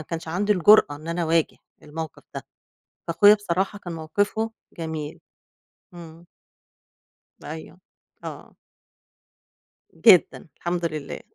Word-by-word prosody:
كانش 160 +1 -6
عَندي 200 +6 +1
الجُرأة 185 -5 +5
إن 155 +3 -11
أنا 170 +1 -2
أواجه 165 -1 +1 0.3
الموقِف 160 0 -7
ده، - - -7 0.6
فاخويا 205 +5 +6
بصراحة 195 0 -2
كان 175 -4 -8
موقِفه 205 +7 -1 0.3
جميل. 160 -2 -5 0.7
إمم. 165 -1 -12 1.2
أيوه. 160 +4 -9 0.4
آه. - - -9 1.4
جدًا، 185 -6 +4
الحمد 175 0 -2
لله، 155 -3 -4
170 Hz, 100 wpm, -24 LUFS, 160-190 Hz, 1.4 s, فاخويا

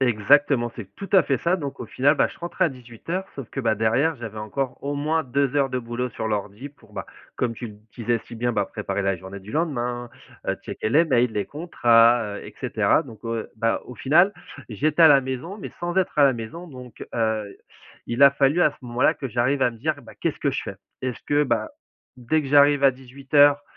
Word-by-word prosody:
Exactement, 120 +1 +3
c'est 100 -5 -9
tout 195 - -7
à 190 - +7
fait 135 -3 0
ça. 170 +8 +1
Donc 140 -5 -6
au 120 - -5
final, 140 +6 +2
bah - - +4
je - - -13
rentrais 175 0 -1
à - - +3
18:00 130 - -6
sauf 135 -5 -7
que 135 - -4
bah 110 -4 +1
derrière 130 +9 +1
j'avais 115 -3 -7
encore 125 +5 -3
au 145 +1 -2
moins 155 +3 0
2 140 +1 0
heures 135 -2 +2
de 125 - -1
boulot 120 +1 -4
sur 110 - -4
l'ordi 105 +5 -4
pour 145 - -23
bah - - -6 0.3
comme 120 -2 -1
tu 120 - -6
l 105 -2 -12 0.2
disais 120 0 0
si - - -10
bien, 120 +1 -1
bah 100 -2 0
préparer 100 0 -3
la 95 -1 0
journée 95 +2 -9
du 100 +4 -12
lendemain, 120 -6 -2 0.4
heu, - - 0
checker - - -3
les 155 +9 +4
mails, 125 -5 +2
les 100 -2 -2
contrats, 120 -8 +3
heu - - -10
et - - -11
cetera - - +2
donc 110 -2 -12
heu, 115 -1 -4
bah 115 +1 0
au 125 - -10
final 175 +11 +4 0.4
j'étais 150 - -1
à 160 - +10
la 140 -2 +7
maison 130 +10 -5
mais - - -7
sans 175 +1 -3
être 185 -5 0
à 145 - +7
la 135 - +5
maison 120 +10 -7
donc 125 -6 -11
heu, 110 -3 -1 0.5
il 120 +4 0
a 140 - +9
fallu 140 +4 +2
à - - +5
ce - - -20
moment-là 120 +3 +2
que 135 - -5
j'arrive 125 +4 +1
à 125 - +3
me 115 - -13
dire: 150 +3 -2
«Bah - - -14
qu'est-ce - - -3
que - - +1
je - - -2
fais?» - - -6 0.3
Est-ce 130 -2 -3
que 145 0 +2
bah, 115 -5 -1 0.5
dès 130 +6 0
que 135 - -6
j'arrive 145 0 +5
à 135 - +8
18:00, 140 +3 +2
125 Hz, 230 wpm, -24 LUFS, 115-145 Hz, 0.5 s, à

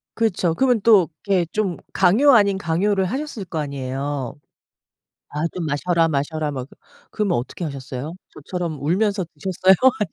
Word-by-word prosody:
그렇죠. 185 -7 +1
그러면 250 +2 +2
또 205 -7 +6 0.2
이렇게 190 -4 +2
좀 200 -5 -1
강요 265 +11 +5
아닌 200 -4 +4
강요를 190 +3 +1
하셨을 260 0 -4
거 165 -2 -4
아니에요. 140 -2 -3 1.0
"아 150 +2 -2
좀 175 -3 -3
마셔라, 165 +3 +1
마셔라." 150 +1 -1
막 130 -2 -5
그 - - -18 0.4
그러면 205 -5 0
어떻게 125 +8 -5
하셨어요? 140 0 -5 0.2
저처럼 170 +1 -4
울면서 195 +6 +1
드셨어요? 185 +4 +3 0.2
아님 210 -5 -1
175 Hz, 345 characters per minute, -22 LUFS, 145-200 Hz, 1.0 s, 또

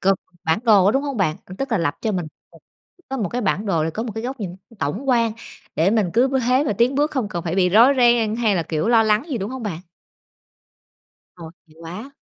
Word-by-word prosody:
cầm 195 +1 +3 0.3
bản 160 +3 +2
đồ 205 -5 +5
á, 205 - +4
đúng 270 - +1
hông 280 -3 -4
bạn? 175 -7 0
Ừ, 185 - -9
tức 270 -2 -3
là 220 - +2
lập 165 -4 0
cho 220 - -1
mình 175 -4 -2 0.3
một - - -16 0.5
có 270 - -3
một 210 -8 -2
cái 245 - -3
bản 205 0 -1
đồ 165 -5 +1
để 160 - -1
có 220 - -4
một 230 -3 -5
cái 225 - -4
góc 255 0 -5
nhìn 180 -2 -5
t 205 +3 -23
tổng 200 - -3
quan, 230 -3 +2 0.4
để 170 +5 +2
mình 210 -6 +1
cứ 250 +4 +3
b 270 - -5
thế 260 +3 +3
và 285 - 0
tiến 235 +6 +1
bước, 295 +3 +1
không 250 -7 -2
cần 170 -4 -4
phải 170 0 -2
bị 185 -2 +3
rối 230 +8 +6
ren 235 -3 +3
hay 220 -5 +1
là, 170 - 0
kiểu, 160 +6 -2
lo 230 -2 +5
lắng 215 0 +2
gì, 250 - -1
đúng 195 +3 -4
hông 260 -2 -6
bạn? 185 -7 -4 1.6
Ôi, 165 -3 -10 0.2
hay 155 - -22
quá. 180 +11 -8
215 Hz, 265 wpm, -21 LUFS, 180-245 Hz, 1.6 s, rối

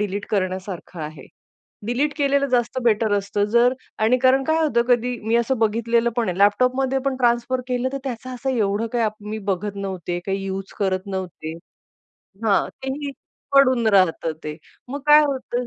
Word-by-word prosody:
Delete 205 0 -2
करण्यासारखं 185 -3 -3
आहे. 150 -3 -8 0.6
Delete 280 +5 0
केलेलं 280 -1 +2
जास्त 245 0 +1
बेटर 220 -2 +2
असतं, 200 +1 -1
जर 240 +2 +5 0.2
आणि 225 +4 +3
कारण 265 +1 +5
काय 315 +2 +2
होतं, 235 -6 +2
कधी 245 0 +2
मी 225 - 0
असं 235 +1 +1
बघितलेलं 230 +2 +1
पण 230 -5 +1
आहे 180 - -2
लॅपटॉपमध्ये 255 +6 +3
पण 270 -1 0
ट्रान्सफर 240 +1 +1
केलं, 250 +1 0
तर 275 - -2
त्याचा 255 0 -5
असं 265 +2 -2
एवढं 215 -2 0
काही 230 -2 +2 0.2
मी 220 - -3
बघत 200 +2 -2
नव्हते, 185 -3 -4
काही 195 0 -2
युज 195 0 -5
करत 190 -1 -1
नव्हते. 180 -5 -5 0.9
हां. 205 -3 +3 0.2
तेही 280 +2 -3 0.4
पडून 255 -4 +5
राहतं 165 -3 +2
ते. 150 0 -5 0.3
मग 280 +3 -5
काय 300 0 +8
होतं, 255 -3 -2
230 Hz, 165 wpm, -22 LUFS, 195-255 Hz, 0.9 s, काय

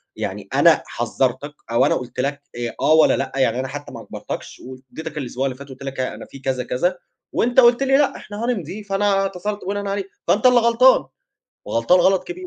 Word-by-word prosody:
يعني - - -5
أنا - - +5
حذّرتك 135 +3 -2 0.2
أو 115 - +4
أنا - - +2
قُلت 125 0 -6
لك 140 +2 -1
آآ، 120 -1 -4
آه 150 +3 +4
والّا 160 - +5
لأ - - -3
يعني 130 -2 +1
أنا 130 - -2
حتّى 145 +2 -8
ما - - -8
اجبَرتكش - - -8
وادّيتك 135 +5 -9
الأسبوع 130 -1 -3
اللي 130 -2 -2
فات 140 0 -11
قُلت 130 +1 -10
لك 135 -1 -6
ها 130 - -2
أنا - - -10
في 135 - -13
كذا 130 -2 -2
كذا 175 +10 -1 0.3
وأنت 245 +2 +2
قُلت 240 +2 +5
لي: 270 0 +4
"لأ 290 - +2
إحنا 210 +3 -6
هنمضي"، 205 -3 -3
فأنا 195 0 +1
اتصلت 195 +1 -4
بناءً 200 +1 -3
عليه، 195 -1 -2 0.2
فأنت 215 +5 +2
اللي 250 -1 +6
غلطان 235 - +5 0.6
وغلطان 115 +11 +3
غلط 190 +1 +3
كبير. 365 +1 -7
175 Hz, 205 wpm, -21 LUFS, 130-210 Hz, 0.6 s, اللي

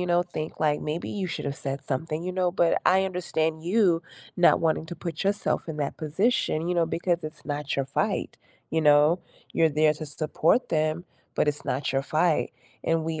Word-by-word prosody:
you 180 - -1
know, 175 0 +4 0.2
think, 155 0 -4
like, 150 -1 +2
"Maybe 155 +3 -3
you 195 -2 -2
should 165 - -4
have 140 -1 -3
said 135 0 -1
something," 155 +4 -2
you 185 - -3
know, 180 -1 +1
but 170 -1 +2
I 190 0 +3
understand 160 -4 -1
you 180 -3 +3 0.3
not 175 - +5
wanting 160 0 +1
to 175 - -7
put 165 -3 -3
yourself 200 -3 0
in 160 - -4
that 145 -2 -2
position, 165 +8 +1
you 180 - +1
know, 170 -1 +2
because 170 +1 0
it's 155 0 -7
not 145 -1 -3
your 135 - +1
fight, 135 - -2 0.4
you 160 - +3
know? 150 +3 +5 0.4
You're 165 - +5
there 155 0 +5
to 155 - -4
support 155 - +1
them, 155 +2 0 0.3
but - - +2
it's 150 0 -1
not 135 0 -1
your 135 0 +1
fight. 155 +3 +1 0.4
And 165 -1 +1
we 160 -1 -3
160 Hz, 205 wpm, -26 LUFS, 150-175 Hz, 0.4 s, not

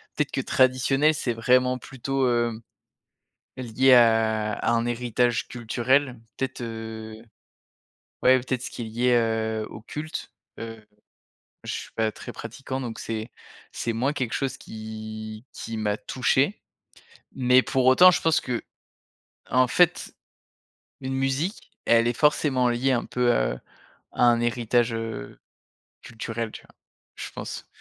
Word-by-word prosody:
Peut-être - - -1
que - - -1
traditionnel, 135 +4 +3
c'est 125 -5 -2
vraiment 125 +2 +3
plutôt, 135 +1 -2
heu, 120 -2 +1 1.0
lié 130 +1 +3
à 110 -3 +4
à 115 - 0
un 115 0 +1
héritage 120 0 0
culturel, 125 +2 0 0.2
peut-être, 130 -2 -3
heu, 110 -1 -6 1.1
ouais, 130 0 +6
peut-être 125 0 -3
ce - - -4
qui - - -7
est - - -3
lié, 120 +3 0
heu, 110 -2 +1
au 105 - -10
culte. 150 +7 -6 0.3
Heu, 115 -1 -8 0.8
je - - -3
suis - - -6
pas 110 -1 +1
très - - -8
pratiquant 130 +3 -6
donc 120 -3 -5
c'est 110 0 -5 0.4
c'est 115 - -2
moins 130 +6 0
quelque 130 -5 -2
chose 135 -2 -2
qui 110 +1 -8
qui 115 - -6
m'a 105 -1 -1
touché. 130 - 0 0.7
Mais 125 0 +4
pour 130 -1 0
autant 180 +8 +8
je - - 0
pense 160 -1 +3
qu'en 125 -2 -6 0.8
fait, 175 +4 +2 0.9
une 130 0 -4
musique, 135 - -2
elle 115 0 +4
est 120 - +1
forcément 140 -4 +3
liée 125 +3 +1
un 120 - 0
peu, 125 -1 +1
heu, - - +1 0.6
à - - +1
un 120 -1 +5
héritage, 120 0 +1
heu, 115 0 -5 0.6
culturel, 115 -1 -5
tu - - -10
vois? - - -22 0.4
Je - - -6
pense. - - -7
120 Hz, 140 wpm, -25 LUFS, 115-130 Hz, 1.1 s, autant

